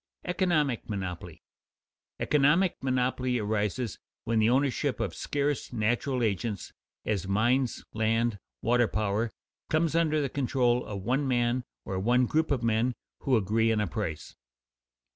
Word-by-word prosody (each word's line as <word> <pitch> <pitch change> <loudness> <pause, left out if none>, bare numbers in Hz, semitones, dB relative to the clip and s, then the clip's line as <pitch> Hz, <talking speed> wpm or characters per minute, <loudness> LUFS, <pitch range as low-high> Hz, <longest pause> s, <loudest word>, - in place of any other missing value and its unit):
[Sidenote: - - -8
Economic 155 - +1
monopoly] 95 -4 -5 0.8
Economic 150 +6 +3
monopoly 130 -1 0
arises 105 +1 -1 0.2
when 115 0 +1
the 110 +1 +4
ownership 135 +1 +1
of 100 -7 -2
scarce 145 - -2
natural 120 +3 0
agents, 105 -2 -2 0.3
as 100 -4 -1
mines, 120 +6 +1
land, 115 0 +1 0.2
water 120 0 +3
power, 105 +2 0 0.4
comes 160 0 +2
under 160 -2 +2
the 140 - +1
control 125 -2 +1
of 100 -2 -6
one 135 +6 +1
man 120 0 +1 0.2
or 95 -1 -2
one 125 +5 +3
group 155 +5 +1
of 130 -4 0
men 115 +2 +1 0.2
who 130 -3 +2
agree 110 +2 +2
on 110 - +1
a 105 - +1
price. 85 -4 -4
120 Hz, 140 wpm, -29 LUFS, 110-135 Hz, 0.8 s, the